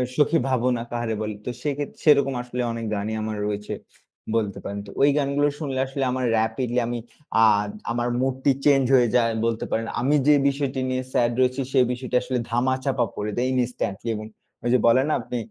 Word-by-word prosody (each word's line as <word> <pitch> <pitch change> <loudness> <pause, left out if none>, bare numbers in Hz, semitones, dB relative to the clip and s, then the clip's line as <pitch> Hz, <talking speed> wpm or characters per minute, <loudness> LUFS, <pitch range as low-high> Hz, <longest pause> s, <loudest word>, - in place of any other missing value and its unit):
সখি 155 +2 +3
ভাবনা 125 -2 +1
কাহারে 120 -2 -2
বলি। 105 -1 -3
তো - - -2
সেক্ষেত্রে 145 -1 -3
সেরকম 140 -3 +5
আসলে 125 0 -4
অনেক 115 -1 -4
গানই 105 +2 -3
আমার 110 -1 -3
রয়েছে। 105 0 -3 0.6
বলতে 105 -3 0
পারেন। 100 0 -5
তো - - -9
ওই 145 - +6
গানগুলো 145 +1 +2
শুনলে 135 -4 -3
আসলে 135 0 -3
আমার 130 0 -1
রেপিডলি 120 +2 0
আমি 120 0 -3 0.4
আ - - +7 0.5
আমার 120 0 -1
মুডটি 130 +1 +1
চেঞ্জ 140 -2 +5
হয়ে 120 -2 +5
যায় 115 -2 +3
বলতে 115 -1 -1
পারেন। 115 0 0 0.2
আমি 140 +4 +3
যে 150 - +7
বিষয়টি 140 -1 -1
নিয়ে 130 0 -1
স্যাড 120 0 +3
রয়েছি, 130 +1 +2
সে 135 - +3
বিষয়টা 125 0 -1
আসলে 130 0 -2
ধামাচাপা 130 +1 +1
পড়ে 105 +1 -3
দেই 125 +1 +1
ইনস্ট্যান্টলি 120 -3 -2
এবং 110 0 -6 0.4
ওই 120 - 0
যে - - +6
বলেন 130 +4 +5
না, - - +2
আপনি 125 - -5
125 Hz, 190 wpm, -24 LUFS, 115-135 Hz, 0.6 s, আ